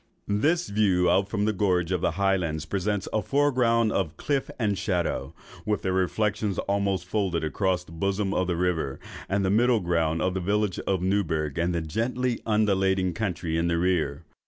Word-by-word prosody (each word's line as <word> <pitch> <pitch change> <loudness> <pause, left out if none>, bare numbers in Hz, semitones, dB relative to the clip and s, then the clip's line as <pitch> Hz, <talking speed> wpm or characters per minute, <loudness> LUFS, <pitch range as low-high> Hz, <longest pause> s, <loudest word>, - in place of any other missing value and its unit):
This 155 +13 +1
view 95 -4 +3
out 95 +2 +2
from 105 0 0
the 110 - +1
gorge 90 -3 +1
of 90 -2 0
the - - +1
highlands 90 -6 0
presents 100 +2 -2
a 110 - +2
foreground 125 -6 +2
of 85 -5 -1
cliff 140 -2 -1
and 105 -4 0
shadow, 95 -3 -2 0.3
with 105 -1 -1
their 95 - 0
reflections 100 +2 0
almost 100 -2 0
folded 95 -4 -1
across 90 +3 0
in 85 - -14
the 80 - -10
bosom 100 +1 0
of 90 - 0
the 90 - 0
river, 85 -6 -1 0.3
and 100 0 +1
a 95 - +2
middle 120 +2 +4
ground 85 -3 0
of 90 +3 0
the 95 - -1
village 105 +1 0
of 95 -2 0
Newburgh 80 -7 0
and 85 +1 0
the 85 - 0
gently 120 +9 -1
undulating 95 -4 +2
country 85 -4 -2
in 85 - +1
the 85 0 +1
rear. 85 -4 0
95 Hz, 185 wpm, -26 LUFS, 85-105 Hz, 0.3 s, middle